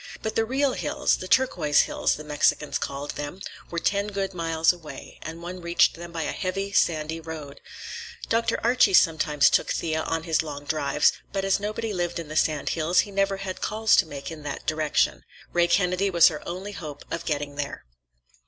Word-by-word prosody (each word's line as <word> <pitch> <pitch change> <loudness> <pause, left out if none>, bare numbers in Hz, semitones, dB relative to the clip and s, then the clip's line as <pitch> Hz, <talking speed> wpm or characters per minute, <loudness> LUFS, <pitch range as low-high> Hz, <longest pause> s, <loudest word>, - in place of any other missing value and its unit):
But 220 - -2
the 225 - +2
real 265 +3 +1
hills—the 185 - 0
Turquoise 180 - +3
Hills, - - 0
the 155 - -8
Mexicans 150 0 +1
called 140 +1 -4
them—were 170 +3 -7
ten 200 +4 +1
good 195 -2 -3
miles 165 -1 +2
away, 165 -4 -11
and 165 +2 -7
one 180 +1 -6
reached 170 0 +3
them 170 0 -9
by 165 -1 -3
a - - -2
heavy, 195 +1 -3
sandy 160 -4 +1
road. 155 -3 -8 0.7
Dr. 230 0 +1
Archie 235 -5 +4
sometimes 155 -4 +4
took - - +3
Thea 160 -1 -1
on 165 0 -2
his 165 -2 +1
long 145 -2 -7
drives, 145 -1 +2 0.2
but 195 -1 -2
as 195 0 +2
nobody 215 +1 -3
lived 175 -2 -2
in 165 -3 -6
the 155 - -6
sand 155 -2 +1
hills, 165 +2 +3
he 205 - -8
never 195 0 +1
had 190 -1 -6
calls 220 +1 +3
to 180 - +4
make 145 +1 -7
in 160 -2 -8
that 145 -1 -6
direction. 155 -1 +1 0.3
Ray 175 0 +4
Kennedy 180 +2 +2
was 170 -2 +7
her 150 -3 -6
only 185 +4 -5
hope 150 -7 -8
of 165 - -3
getting 145 -2 -2
there. 140 - -5
170 Hz, 190 wpm, -25 LUFS, 155-195 Hz, 0.7 s, was